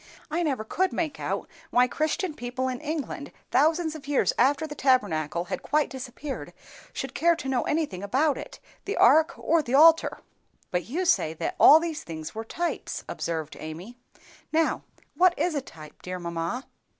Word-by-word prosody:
I 335 +3 0
never 275 -9 -1
could 370 +12 0
make 320 -3 -2
out - - -3 0.2
why 250 0 +4
Christian 310 - -1
people 255 -1 -3
in 255 +2 -3
England, 295 -2 -4 0.2
thousands 315 +4 +2
of 300 -3 -10
years 290 -2 +2
after 285 +5 +3
the 300 - -6
Tabernacle 175 - +1
had - - -4
quite 300 +1 +1
disappeared, 265 +2 -6 0.4
should - - -5
care 340 +1 +3
to 320 - -7
know 260 -2 +1
anything 300 - -1
about 270 +9 +1
it, - - -9 0.3
the 400 - -3
ark, 315 +6 +5
or 330 0 +2
the 265 -2 -1
altar." 325 +3 +6 0.5
"But 180 -1 -1
you 340 +10 -2
say 165 - +2
that - - -3
all 310 - +9
these 325 -2 -4
things 160 -2 -7
were 220 +1 -5
types," 340 +9 -3
observed 160 -3 -4
Amy. 165 +9 -8 0.6
"Now, 320 0 +1 0.3
what 360 -1 +4
is 355 - 0
a 285 - -1
type, 155 - -13
dear 185 0 -5
mamma?" 170 +8 -4
275 Hz, 175 wpm, -26 LUFS, 215-315 Hz, 0.6 s, all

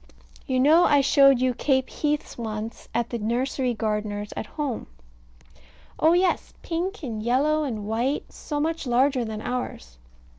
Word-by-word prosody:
You 260 -1 +1
know 315 +6 +6
I 285 -1 +5
showed 275 -1 +5
you 255 0 +2
Cape 265 +1 +1
heaths 295 -1 -2
once 220 -1 -6
at 235 0 -1
the 235 - -2
nursery 245 +3 -1
gardener's 210 -1 -2
at - - -4
home. 290 -6 -4 1.1
Oh 320 +2 +5
yes, 360 0 +1
pink, 355 +3 -3
and 225 -5 -4
yellow, 285 +7 +2
and 220 -7 -4
white; 235 +7 -1
so 295 -1 -4
much 320 -1 -2
larger 255 +1 +2
than 220 -1 -5
ours. 65 - -5
255 Hz, 150 wpm, -25 LUFS, 225-295 Hz, 1.1 s, know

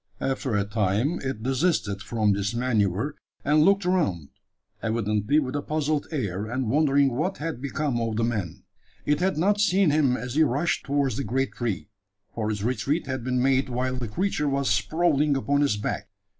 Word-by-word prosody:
After 130 -3 -1
a 100 -1 +1
time 105 - 0
it 130 -5 -4
desisted 130 - 0
from 110 -3 +1
this 100 +3 -2
manoeuvre, 115 +1 0 0.3
and 150 +2 +4
looked 195 +3 +4
around 150 - 0 0.5
evidently 110 +3 0
with 135 -3 0
a 145 - 0
puzzled 150 0 -1
air, 105 - -3
and 120 -1 -2
wondering 140 -1 +3
what 165 +10 -1
had 155 -4 -4
become 140 -3 -1
of 115 -1 -1
the 115 - 0
man. 100 -6 -3 0.4
It 150 - +2
had 185 -2 +1
not 205 +5 +2
seen 195 -4 +3
him 140 -4 +2
as 125 +1 -5
he 155 - +3
rushed 150 +3 +1
towards 140 -2 0
the 140 - -2
great 135 +4 -1
tree: 110 -6 -3 0.4
for 110 -2 -2
his 105 -2 -3
retreat 130 +7 0
had 130 -2 -4
been 125 0 0
made 135 0 +2
while 130 +1 -1
the 125 -2 -3
creature 150 - -1
was 140 -4 0
sprawling 145 +6 +2
upon 140 +2 +1
its 140 -7 +2
back. 105 - -3
130 Hz, 185 wpm, -25 LUFS, 110-150 Hz, 0.5 s, and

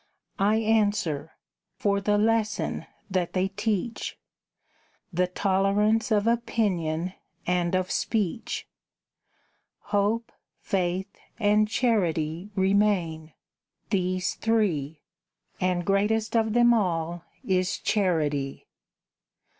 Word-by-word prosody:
I 205 +2 +3
answer: 205 -9 +1 0.4
"For 200 -1 +1
the 205 +1 +2
lesson 220 0 0 0.2
that 180 -2 0
they 185 +1 +1
teach: 210 +2 -2 1.0
The 180 +2 +2
tolerance 200 +4 +2
of 210 -2 +2
opinion 190 -8 0 0.3
and 180 0 +1
of 185 0 0
speech. 220 -1 -1 1.3
Hope, 210 +3 +1 0.3
Faith, 185 +1 -2 0.2
and 210 -1 +3
Charity 180 -7 0
remain, 190 -5 +1 0.6
these 185 -2 0
three; 165 -10 0 0.6
And 180 -1 0
greatest 210 +4 +1
of 220 -1 +2
them 240 0 +5
all 170 -5 0 0.2
is 185 0 +1
Charity." 150 -9 0
195 Hz, 90 wpm, -26 LUFS, 175-215 Hz, 1.3 s, them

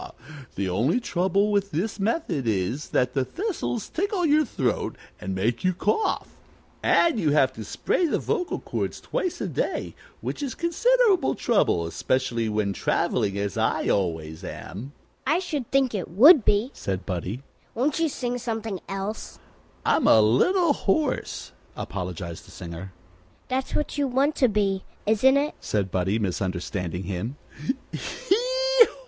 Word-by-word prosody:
The 100 0 -1
only 115 - +2
trouble 200 -1 +1
with 200 -1 +1
this 195 +6 -2
method 195 - -1
is 110 +7 -1
that 125 0 +1
the 135 - +1
thistles 350 - -3
tickle 385 0 -1
your 305 0 +4
throat 130 - -1 0.2
and 95 0 -4
make 110 +5 0
you 185 0 +3
cough, 210 - 0 0.5
and 330 -9 +3
you 160 -6 +2
have 130 -3 +4
to 110 - -7
spray 345 - 0
the - - +1
vocal 380 -6 -1
cords - - -3
twice 365 - -2
a - - -1
day, - - -2 0.3
which - - -4
is 275 -3 -3
considerable 400 - +3
trouble, 195 - +2
especially 115 +5 0
when 105 -2 0
traveling, 100 +1 0
as 100 -2 -2
I - - +1
always 80 -5 -1
am." 120 +11 -7 0.3
"I 310 +4 +4
should 305 -9 -3
think 270 -3 +2
it 195 -4 -3
would 255 - +8
be," 210 +6 +2
said 95 -1 -4
Buddie. 95 +7 -4 0.3
"Won't 280 +6 +1
you 325 -1 +2
sing 245 -2 -3
something 225 -4 -3
else?" 195 +3 -4 0.5
"I'm - - +3
a 110 - +7
little 305 - +4
hoarse," 275 +5 -1 0.3
apologized 90 -3 -5
the - - -14
singer. 85 +2 -8 0.6
"That's 260 +1 -1
what 295 -1 -1
you 285 - +2
want 270 +4 +2
to 255 - +5
be, 195 -2 +1 0.2
isn't 240 +6 +4
it?" 290 +2 0
said 100 -3 -1
Buddie, 95 +4 +1
misunderstanding 90 -2 -2
him. 100 +8 -4
190 Hz, 145 wpm, -25 LUFS, -, 0.6 s, would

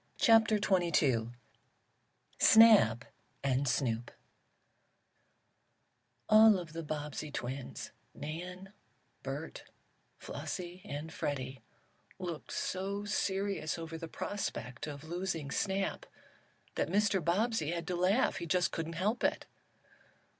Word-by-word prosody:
CHAPTER 225 -2 +5
XXII 165 - +2 1.1
SNAP 210 - +7 0.4
AND 135 0 +1
SNOOP 120 -2 0 2.2
ALL 215 -1 +7
of 170 -4 -7
the 165 - -4
Bobbsey 150 -1 -4
twins 130 -1 -5 0.2
Nan, 180 +6 -7 0.5
Bert, - - -6 0.5
Flossie 180 -1 -6
and 155 -2 -6
Freddie 130 -2 -3 0.6
looked 175 -4 -6
so 200 +2 -3
serious 195 -4 -1
over 165 0 -6
the 165 0 -6
prospect 155 -9 -4
of 145 -1 -7
losing 165 -3 -3
Snap 195 +3 -1 0.7
that - - -1
Mr. 200 -1 +2
Bobbsey 195 0 +1
had 170 -1 -3
to 180 0 -2
laugh. 190 +9 +2
He 170 - -5
just 180 +2 +2
couldn't 165 0 -4
help 200 +8 -1
it. - - +1
170 Hz, 105 wpm, -32 LUFS, 150-195 Hz, 2.2 s, SNAP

